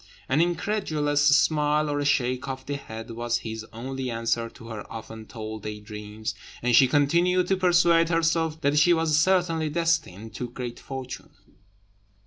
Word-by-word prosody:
An 140 +4 +2
incredulous 170 -5 0
smile 150 0 +3
or 145 0 -1
a 145 - -1
shake 130 -2 +1
of 130 -1 -5
the 145 - -3
head 115 -4 -8
was 120 +1 -1
his 110 0 -5
only 130 +3 -5
answer 115 0 -1
to 115 - -14
her 110 -2 -8
often 110 -1 -8
told 110 -2 -7
day 105 0 -6
dreams; 105 0 -6 0.3
and 120 -1 +3
she 130 - +7
continued 170 +6 +3
to 190 - +4
persuade 175 -2 +4
herself 165 -1 +1
that 145 +1 +3
she 175 +3 +5
was 165 -2 +2
certainly 165 -3 +2
destined 150 - -1
to 125 +2 -5
great 120 -1 -6
fortune. 130 -1 -7
140 Hz, 160 wpm, -26 LUFS, 115-165 Hz, 0.3 s, she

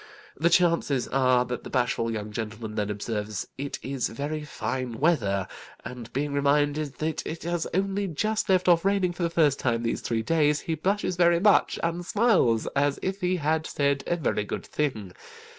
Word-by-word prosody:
The 165 +4 +2
chances 170 -7 +2
are 130 -2 +3
that 125 0 -5
the - - -8
bashful 120 -2 0
young 105 -2 -4
gentleman 110 0 -5
then 105 -1 -2
observes 105 0 -3
it 140 +1 -4
is 135 -2 -2
very 145 +6 -4
fine 130 -5 -4
weather, 100 - +1 0.4
and 120 -2 -8
being 140 +2 -2
reminded 145 +1 +1
that 155 +1 -2
it 160 - -6
has 170 0 -1
only 195 +2 0
just 215 +6 -1
left 185 -1 +3
off 170 -2 +5
raining 195 -2 +1
for 175 - -8
the 170 - +1
first 155 -4 +2
time 115 -2 0
these 115 - -1
three 115 -1 -1
days, 150 +2 +2
he 165 - -2
blushes 185 +3 -1
very 170 -1 +4
much, 205 +2 +4
and 170 +1 -1
smiles 185 - +2
as 140 0 +2
if 190 +1 -2
he 180 0 +1
had 160 -1 0
said 140 -1 0
a 175 - +1
very 150 -10 -1
good 105 - -5
thing. 110 -11 -3
145 Hz, 185 wpm, -26 LUFS, 120-170 Hz, 0.4 s, off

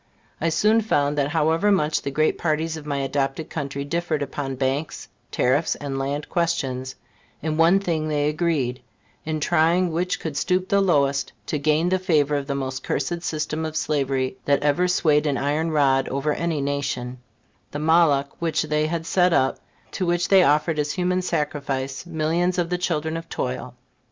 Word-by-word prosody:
I 165 - +2
soon 215 +7 +3
found 145 -9 +1
that 140 - +2
however 160 +6 +2
much 155 -5 +1
the - - -3
great 155 +3 +1
parties 160 0 0
of 155 -2 -9
my 140 -1 -1
adopted 135 +2 -2
country 140 -2 -4
differed 160 -1 -1
upon 135 -1 -4
banks, 135 +4 -2 0.2
tariffs 140 +6 +1
and 135 -2 -4
land 140 +2 -3
questions, 135 -7 -1 0.5
in 155 -1 -1
one 165 +4 +5
thing 165 -5 -1
they 145 -1 0
agreed, 150 -6 -1 0.4
in 155 0 -2
trying 170 +3 +2
which 180 +3 -1
could 160 -3 -5
stoop 185 +5 0
the 200 0 +3
lowest 140 -7 +1
to 150 - -2
gain 155 +4 +2
the 185 0 +1
favor 155 -6 +2
of 140 -1 -2
the 140 - -2
most 130 -1 -3
cursed 170 +5 -2
system 155 -1 -3
of 155 -1 -4
slavery 135 -4 -1
that 140 0 +2
ever 150 +5 +2
swayed 155 -4 +2
an 140 -2 0
iron 150 +4 0
rod 135 -4 +2
over 140 +2 -1
any 165 -2 -1
nation, 135 -3 -3 0.5
the - - -5
Moloch 150 -3 +3
which 165 -3 0
they 150 0 0
had 165 0 -3
set 180 0 +3
up, 135 -5 +2 0.3
to 190 - -3
which 175 0 +1
they 195 -1 +7
offered 150 0 +2
as 145 0 -1
human 180 0 0
sacrifice 140 -3 -3
millions 170 +3 0
of 175 -1 -1
the 180 - +1
children 160 -3 -1
of 165 0 -6
toil. 125 -1 -4
155 Hz, 180 wpm, -23 LUFS, 140-170 Hz, 0.5 s, they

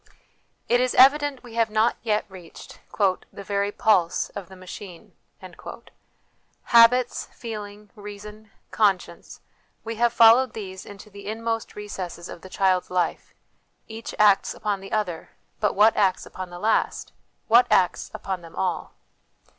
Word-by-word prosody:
It 245 +1 +3
is 255 0 0
evident 280 0 +4
we 240 -2 -12
have 230 -1 +1
not 220 +2 +2
yet 215 -2 0
reached 185 -3 -13 0.2
" 185 -2 0
The 200 - -10
very 200 0 -1
pulse 200 -7 +1
of 195 -3 -9
the 190 - -12
machine." 185 -1 -11 1.5
Habits, 240 +1 +4
feeling, 210 -2 -8
reason, 210 +1 -11 0.2
conscience 200 -4 -1 0.4
we 225 0 -6
have 235 +1 +2
followed 230 +2 +6
these 190 -4 -8
into 205 +1 -12
the 200 0 -11
inmost 225 +1 -3
recesses 185 -4 -7
of - - -10
the 190 - -12
child's 185 -1 +1
life; 180 -1 -2 0.5
each 225 0 -8
acts 205 -2 +4
upon 205 -2 -3
the 195 - -11
other, 190 -7 -3 0.3
but 210 - 0
what 215 +3 +5
acts 190 -2 +1
upon 185 -1 -8
the 175 - -9
last: 220 +5 0 0.4
what 235 +2 +6
acts 180 -2 +2
upon 190 -2 -5
them 165 -1 -13
all 180 -4 -3
210 Hz, 145 wpm, -24 LUFS, 190-225 Hz, 1.5 s, followed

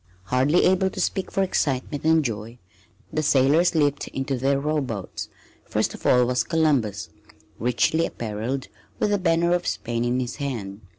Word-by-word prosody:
Hardly 130 - +2
able 190 +1 +3
to - - -8
speak 190 -1 -1
for 195 - +1
excitement 145 -5 -1
and 160 -1 +4
joy 115 0 -4 0.6
the 155 - +1
sailors 150 +5 +3
leaped 145 -2 +1
into 135 0 -3
their 135 +2 +1
rowboats. 140 -9 -3 0.4
First - - -1
of - - -5
all 125 -1 +5
was 125 +1 +1
Columbus, 140 - 0 0.5
richly 125 +7 +2
appareled, 115 +4 -4 0.3
with 210 - 0
the 205 - +2
banner 170 -1 +2
of 175 0 0
Spain 115 0 -2
in 120 +1 0
his 125 -2 -4
hand. 110 -8 -5
135 Hz, 160 wpm, -24 LUFS, 120-160 Hz, 0.6 s, all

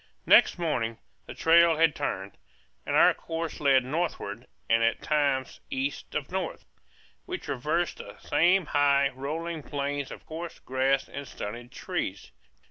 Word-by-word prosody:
Next - - +6
morning 120 -10 -1 0.3
the - - -8
trail 165 0 +5
had 160 -1 +4
turned, 95 +1 -4 0.5
and - - 0
our - - +7
course 165 0 -5
led 135 -3 +4
northward 160 +5 -3 0.2
and 115 0 +3
at 115 0 +1
times 140 -3 0
east 135 +2 -3
of 145 +1 -3
north. 190 0 -3 0.6
We 365 0 -3
traversed 155 - -2
the - - -10
same 180 +2 +3
high, 140 -1 +3
rolling 155 +5 -4
plains 140 -1 -3
of - - -10
coarse 165 +1 -7
grass 130 +1 0
and 140 -1 -7
stunted 120 +4 -7
trees. - - -4
145 Hz, 140 wpm, -28 LUFS, 130-165 Hz, 0.6 s, our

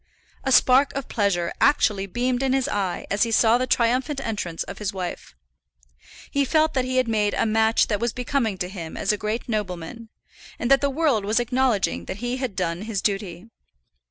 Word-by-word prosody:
A 265 - -1
spark 265 +2 +5
of 275 -2 -4
pleasure 190 -5 0
actually 205 -9 +3
beamed 245 +5 -1
in 265 -1 +1
his 265 -1 +1
eye 190 -4 -2
as 200 +1 0
he 230 - +3
saw 225 +1 +4
the 255 - -1
triumphant 255 +5 +1
entrance 205 -9 -3
of - - -9
his 210 -2 -2
wife. 180 - -6 1.0
He 280 - +2
felt 310 +3 +2
that 260 -2 0
he 255 0 -2
had 255 -1 +2
made 210 -2 +1
a - - +1
match 220 +1 +3
that 210 -2 -1
was 235 0 0
becoming 250 -4 -1
to 180 - -3
him 175 -4 -7
as 200 - +1
a - - +1
great 215 +3 -3
nobleman, 210 +1 -4 0.5
and 245 - -2
that 275 - +6
the 280 - +2
world 275 -7 +1
was 215 +4 +1
acknowledging 240 -3 0
that 190 - -6
he 245 +3 -3
had 255 -6 -4
done 175 -2 -2
his 210 -2 -3
duty. 195 -2 -2
225 Hz, 200 wpm, -24 LUFS, 200-255 Hz, 1.0 s, that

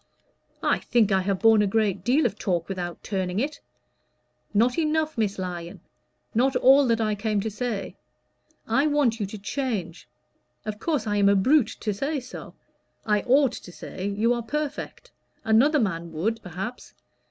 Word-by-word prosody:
"I - - +2
think 225 -4 +2
I 190 -1 +3
have 190 0 -1
borne 225 -1 +6
a 205 - +2
great 200 -3 0
deal 265 +8 +3
of 210 -3 -1
talk 175 -3 -1
without 175 -3 -5
turning 190 -1 -2
it." 285 +4 -2 0.9
"Not 240 +7 +2
enough, 315 0 0
Miss 210 -3 -1
Lyon 175 -2 -5 0.5
not 255 +4 +2
all 270 +1 +6
that 230 -1 +2
I 215 -1 +1
came 210 0 -1
to 220 - -3
say. 210 -4 -4 0.7
I 270 +7 +2
want 285 -6 +2
you 205 - -1
to 215 - -8
change. 205 - -4 0.6
Of 210 -1 -4
course 310 -6 -1
I 205 -1 0
am 200 -1 +5
a 200 - +4
brute 255 +5 +3
to 210 - -1
say 280 +8 -2
so. 250 0 -10 0.5
I 210 -1 +2
ought 270 +1 +4
to 180 - -9
say 185 +2 -6
you 215 +4 +1
are 240 - -2
perfect. 300 - -5 0.3
Another 255 +8 +4
man 170 -6 -2
would, 220 +8 -1
perhaps. 195 +7 -7
220 Hz, 170 wpm, -25 LUFS, 195-255 Hz, 0.9 s, borne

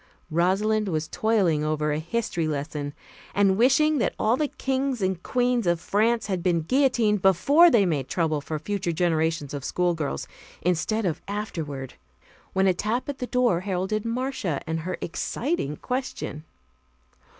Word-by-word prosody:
Rosalind 200 +6 +2
was 155 -3 -1
toiling 195 -9 +1
over 155 0 0
a 150 - 0
history 170 -1 -2
lesson 145 -1 -4 0.4
and 195 -1 +4
wishing 275 +7 +4
that - - 0
all 220 +3 +2
the 300 +3 0
kings 265 -2 -2
and 190 -2 -1
queens 245 -3 +1
of 170 -1 +2
France 220 +6 +1
had 190 -3 -2
been 170 -2 +2
guillotined 235 - +2
before 275 - +6
they 230 -10 +4
made 145 -7 -1
trouble 155 -4 0
for 155 +2 -4
future 185 +2 -2
generations 160 -3 0
of 140 -2 -5
schoolgirls, 165 - -1 0.4
instead 180 +5 0
of 165 -3 -1
afterward, 160 - -4 0.6
when 190 0 +2
a 190 - +4
tap 220 +9 -2
at 280 - -4
the 250 - -3
door 245 -9 +2
heralded 190 +2 -2
Marcia 230 - -2
and 160 0 -2
her 180 +3 -4
exciting 170 - -2
question. 250 - -4
190 Hz, 150 wpm, -25 LUFS, 160-230 Hz, 0.6 s, before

